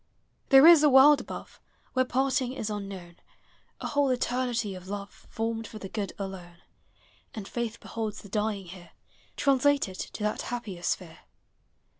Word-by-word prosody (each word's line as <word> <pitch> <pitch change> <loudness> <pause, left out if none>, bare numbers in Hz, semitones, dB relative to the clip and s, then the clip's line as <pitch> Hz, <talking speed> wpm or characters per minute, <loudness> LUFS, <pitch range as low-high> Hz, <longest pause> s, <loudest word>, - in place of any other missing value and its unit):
• - - -38
There 270 +2 +8
is 335 -2 +9
a 300 - +5
world 275 +2 +7
above. - - -9 0.3
Where 255 0 +2
parting 260 0 0
is 220 -5 -4
unknown; 195 -4 -7 0.6
A - - -4
whole 285 -1 +2
eternity 245 -4 -1
of 185 0 -10
love. 200 0 -8
Formed 225 0 -3
for 220 - -10
the 195 -2 -8
good 205 -2 -3
alone; 185 -3 -8 0.7
And 205 -3 -6
faith 235 -2 -4
beholds 220 -2 -5
the 200 - -12
dving 210 -1 -1
here 175 -2 -12 0.4
Translated 275 -7 +2
to 210 - -6
that 210 0 -1
happier 230 -8 -5
sphere. 170 -2 -3
220 Hz, 155 wpm, -28 LUFS, 195-255 Hz, 0.7 s, is